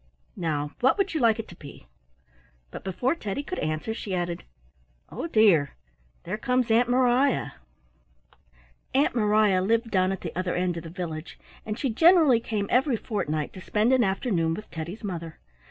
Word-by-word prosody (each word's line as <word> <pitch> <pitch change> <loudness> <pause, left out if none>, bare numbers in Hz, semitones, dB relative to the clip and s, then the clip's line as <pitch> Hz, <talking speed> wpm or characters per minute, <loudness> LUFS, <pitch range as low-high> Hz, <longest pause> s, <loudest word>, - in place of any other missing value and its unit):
Now 150 -4 -2
what 265 +8 +3
would 395 -2 0
you 315 - 0
like 230 -4 +4
it 225 - -5
to 175 - -11
be?" 140 - -13 0.9
But - - -8
before 195 - 0
Teddy 280 -4 -4
could 370 +5 -5
answer 155 +8 -2
she 200 -4 -4
added, 175 -1 -3 0.7
"Oh - - -4
dear! 205 - +4 0.5
There - - -4
comes 250 0 +1
Aunt 240 +2 +4
Mariah." 255 +2 +2 1.4
Aunt 280 +3 +3
Mariah 210 -4 +3
lived 225 +4 +1
down 185 -1 +2
at 195 - -4
the 165 - -6
other 180 0 -1
end 180 -1 0
of 165 - -6
the - - -7
village, 165 -2 -6 0.3
and 215 0 -3
she 270 - -1
generally 320 -2 +5
came 215 -3 -2
every 255 0 +3
fortnight 155 -10 -3
to 185 - -10
spend 215 +6 +1
an 255 -2 +4
afternoon 190 -5 0
with 215 - -10
Teddy's 170 +7 -6
mother. 170 -5 -5
210 Hz, 170 wpm, -26 LUFS, 175-245 Hz, 1.4 s, generally